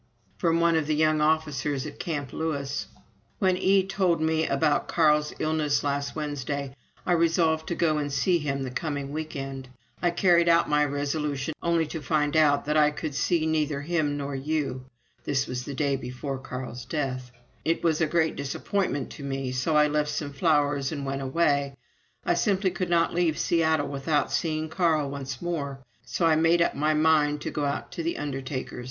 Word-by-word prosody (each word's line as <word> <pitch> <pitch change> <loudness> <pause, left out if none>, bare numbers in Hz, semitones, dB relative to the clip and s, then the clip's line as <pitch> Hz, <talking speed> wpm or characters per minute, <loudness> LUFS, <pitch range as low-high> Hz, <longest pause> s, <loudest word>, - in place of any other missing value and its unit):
From 165 -1 +2
one 170 0 +3
of 160 -2 +1
the 155 - +1
young 155 0 +3
officers 150 -3 0
at 150 - -8
Camp 145 -7 -4
Lewis: 140 -3 -2 0.5
"When 185 -2 +2
E 190 +1 +3
told 190 -3 +1
me 160 0 +1
about 145 +2 +1
Carl's 150 -2 +3
illness 155 -2 0
last 140 0 -2
Wednesday, 140 -2 -3 0.3
I - - 0
resolved 165 -1 +2
to 170 - -2
go 155 -3 +2
and 145 -1 -2
see 175 +5 +2
him 140 -3 -2
the 130 - -4
coming 140 0 -3
week 155 +1 -5
end. 135 -1 -6 0.3
I 175 - +3
carried 170 -1 +4
out 170 0 +4
my 150 0 +3
resolution, 145 0 -2
only 170 -1 +2
to 155 +1 -6
find 150 -2 0
that 150 -1 +3
I 150 -1 +5
could 150 0 -5
see 160 +3 +1
neither 155 -2 0
him 150 -2 0
nor 140 0 -4
you. 135 -2 -2 0.4
[This 135 -2 0
was 125 0 -4
the 140 - -5
day 140 -1 +1
before 130 +2 -5
Carl's 125 -2 -6
death.] 130 -2 -3 0.3
It 165 +1 0
was 165 -1 +2
a 160 - +3
great 160 0 +1
disappointment 140 +1 -2
to 145 - -9
me, 135 -1 -3
so 130 +5 0
I 150 - +6
left 150 0 0
some 150 -1 -3
flowers 145 -3 +1
and 140 -3 -4
went 135 0 -3
away.... 140 0 +1 0.5
I - - +3
simply 190 +2 +1
could 180 0 -3
not 170 -1 +2
leave 170 -3 +1
Seattle 160 -3 +2
without 145 +2 0
seeing 155 -1 -1
Carl 160 -4 +1
once 135 -1 -6
more, 145 -6 -3 0.3
so 170 - -1
I 160 -1 +5
made 165 +2 +4
up - - 0
my 155 +2 +1
mind 150 -1 +3
to - - -4
go 150 - -1
out 140 - -3
to 180 -2 -4
the 165 +1 -2
undertaker's. 135 -3 -4
150 Hz, 185 wpm, -26 LUFS, 140-160 Hz, 0.5 s, I